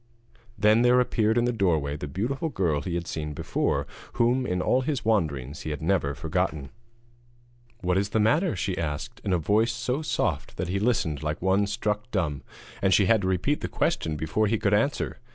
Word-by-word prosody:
Then 110 Hz, +2 st, +4 dB
there 125 Hz, +1 st, +5 dB
appeared 115 Hz, -2 st, +2 dB
in 120 Hz, -, +3 dB
the 120 Hz, -, +2 dB
doorway 80 Hz, -9 st, +1 dB
the 75 Hz, 0 st, -5 dB
beautiful 130 Hz, -, -2 dB
girl 85 Hz, -, 0 dB
he 85 Hz, +4 st, -3 dB
had 85 Hz, 0 st, -2 dB
seen 75 Hz, -3 st, -4 dB
before, -, -, -1 dB, 0.3 s
whom 125 Hz, +2 st, +2 dB
in 90 Hz, -, -1 dB
all 125 Hz, +7 st, +2 dB
his 135 Hz, -2 st, -2 dB
wanderings 75 Hz, -, 0 dB
he -, -, -5 dB
had 75 Hz, -2 st, -3 dB
never 80 Hz, -5 st, +1 dB
forgotten. 75 Hz, -3 st, -2 dB, 1.1 s
'What 90 Hz, 0 st, +1 dB
is 100 Hz, +1 st, -1 dB
the 110 Hz, -, 0 dB
matter?' 150 Hz, -, +2 dB
she 95 Hz, -4 st, -2 dB
asked, 80 Hz, +10 st, -4 dB
in 100 Hz, -, -1 dB
a 90 Hz, -, +3 dB
voice 105 Hz, +8 st, +2 dB
so 125 Hz, +5 st, -2 dB
soft 155 Hz, -, -2 dB
that 90 Hz, -, -3 dB
he 100 Hz, +2 st, 0 dB
listened 100 Hz, -, 0 dB
like 75 Hz, 0 st, -2 dB
one 95 Hz, +2 st, +2 dB
struck 105 Hz, +1 st, -2 dB
dumb, 85 Hz, -, -1 dB, 0.4 s
and 95 Hz, -1 st, +4 dB
she 100 Hz, -, +4 dB
had 110 Hz, +2 st, +4 dB
to 95 Hz, -, -1 dB
repeat 95 Hz, -, 0 dB
the -, -, -2 dB
question 80 Hz, -2 st, -1 dB
before 80 Hz, +8 st, 0 dB
he 110 Hz, +2 st, +1 dB
could 105 Hz, -1 st, +1 dB
answer. 115 Hz, +8 st, 0 dB
100 Hz, 200 wpm, -26 LUFS, 80-115 Hz, 1.1 s, there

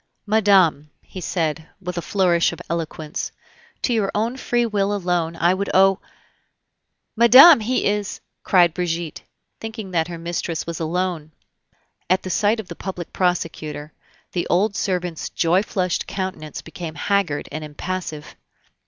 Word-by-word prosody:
"Madame," 195 Hz, -8 st, +3 dB, 0.3 s
said 165 Hz, -3 st, -1 dB
he 160 Hz, -, -16 dB
with 180 Hz, -2 st, -5 dB
a 170 Hz, -, -2 dB
flourish 175 Hz, -3 st, +2 dB
of -, -, -9 dB
eloquence, 160 Hz, -2 st, -4 dB, 0.5 s
"to 245 Hz, -, +1 dB
your 210 Hz, -4 st, +1 dB
own 225 Hz, +4 st, 0 dB
free 240 Hz, -2 st, 0 dB
will 205 Hz, -2 st, 0 dB
alone 175 Hz, -4 st, -1 dB, 0.2 s
would 200 Hz, +1 st, -3 dB
I -, -, -2 dB
owe 195 Hz, 0 st, +5 dB, 0.6 s
" -, -, -55 dB
"Madame, 255 Hz, +7 st, +9 dB
he 245 Hz, +4 st, 0 dB
is 205 Hz, 0 st, -1 dB
" -, -, -55 dB
cried 175 Hz, -3 st, +4 dB
Brigitte, 170 Hz, -2 st, -3 dB, 0.4 s
thinking 220 Hz, -3 st, -7 dB
that 165 Hz, -2 st, +1 dB
her 170 Hz, -1 st, -6 dB
mistress 170 Hz, -1 st, -3 dB
was 170 Hz, -1 st, -5 dB
alone. 165 Hz, -1 st, -2 dB, 0.8 s
At 185 Hz, +1 st, +2 dB
the 185 Hz, -, -4 dB
sight 210 Hz, +5 st, +2 dB
of 215 Hz, -, -6 dB
the 170 Hz, -, -7 dB
public 180 Hz, -2 st, -6 dB
prosecutor, 155 Hz, -4 st, -2 dB, 0.4 s
the 175 Hz, -, -2 dB
old 200 Hz, +4 st, +2 dB
servant's 180 Hz, -5 st, -2 dB
joy 175 Hz, +3 st, +2 dB
flushed 185 Hz, -4 st, -2 dB
countenance 185 Hz, -6 st, -5 dB
became 160 Hz, 0 st, -7 dB
haggard 195 Hz, -8 st, 0 dB
and 155 Hz, -, -5 dB
impassive. 155 Hz, 0 st, -5 dB
180 Hz, 150 wpm, -22 LUFS, 165-200 Hz, 0.8 s, Madame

